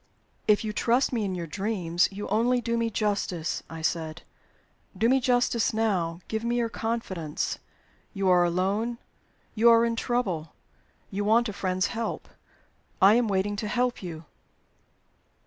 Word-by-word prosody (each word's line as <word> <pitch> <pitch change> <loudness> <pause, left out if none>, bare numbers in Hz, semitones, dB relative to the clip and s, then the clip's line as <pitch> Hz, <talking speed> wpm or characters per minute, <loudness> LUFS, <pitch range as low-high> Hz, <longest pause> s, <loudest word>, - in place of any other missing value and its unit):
"If 210 0 +4
you 215 -1 -3
trust 245 +5 +2
me 230 -3 0
in 190 -2 -2
your 170 -1 -4
dreams, 175 0 0
you 205 +1 -6
only 235 +5 +2
do 235 -1 -1
me 230 0 0
justice," 200 -6 -1
I 160 0 -7
said. 160 0 -2 0.7
"Do 225 - +3
me 265 +2 +4
justice 245 -3 +1
now; 180 -6 0
give 220 0 -3
me 235 +1 0
your 235 -1 0
confidence. 210 -10 -3 0.5
You 195 -2 -1
are 180 -1 +5
alone 195 +7 0 0.6
you 235 +2 +5
are 230 0 +6
in 230 0 0
trouble 195 -11 -2 0.6
you 200 +2 -2
want 225 +3 +3
a - - -5
friend's 185 -1 0
help. 230 0 -3 0.7
I 195 +2 +7
am 240 0 +3
waiting 200 +1 0
to 210 - -3
help 245 +3 0
you." 165 -3 -7
210 Hz, 155 wpm, -27 LUFS, 185-230 Hz, 0.7 s, I